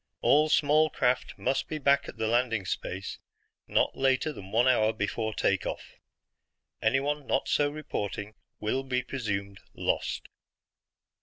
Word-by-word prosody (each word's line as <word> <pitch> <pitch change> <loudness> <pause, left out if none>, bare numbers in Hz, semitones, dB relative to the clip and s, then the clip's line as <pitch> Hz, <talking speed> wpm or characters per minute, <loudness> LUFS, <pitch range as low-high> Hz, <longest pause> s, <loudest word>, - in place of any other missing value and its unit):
All 150 +2 +4
small 155 +1 +4
craft 125 -4 0
must 135 - 0
be 155 - -3
back 140 -1 +2
at - - -10
the 110 - -1
landing 115 -3 +1
space 95 +2 -4 0.5
not - - +1
later 135 +3 +1
than 95 -7 -10
one 120 +4 +3
hour 110 -4 +4
before 110 +2 -2
take 105 - 0
off. - - -7 0.8
Anyone 145 +1 +1
not - - +1
so 145 -1 +2
reporting 105 -8 -4 0.3
will 110 +5 0
be 130 -1 -1
presumed 100 -6 -3 0.2
lost." - - -1
125 Hz, 140 wpm, -29 LUFS, 110-140 Hz, 0.8 s, All